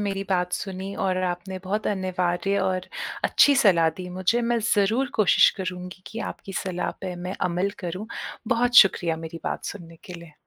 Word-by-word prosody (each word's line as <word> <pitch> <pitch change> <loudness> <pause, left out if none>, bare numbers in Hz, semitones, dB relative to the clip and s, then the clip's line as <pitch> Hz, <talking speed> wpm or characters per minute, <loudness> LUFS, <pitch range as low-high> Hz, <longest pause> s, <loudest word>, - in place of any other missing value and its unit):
मेरी 195 -1 -2
बात 180 -1 +1
सुनी 195 +1 -4
और 185 -1 +1
आपने 180 +1 -4
बहुत 210 +3 -2
अनिवार्य 185 0 0
और 185 -1 -1 0.4
अच्छी 285 - +5
सलाह 180 -9 +5
दी 180 -1 -6
मुझे, 185 +6 +1
मैं 235 0 +1 0.2
ज़रूर 225 +6 +1
कोशिश 215 -4 +5
करूँगी 180 0 -6
कि 225 - -7
आपकी 195 - -11
सलाह 180 -2 -2
पे 185 -2 -4
मैं 180 +2 -5 0.2
अमल 180 +3 0
करूँ। 185 +4 -5 0.4
बहुत 245 +1 +2
शुक्रिया 175 -6 +6
मेरी 165 +1 -8
बात - - -3
सुनने 165 -4 -8
के 180 - -9
लिए। 170 -2 -11
185 Hz, 170 wpm, -25 LUFS, 180-200 Hz, 0.4 s, शुक्रिया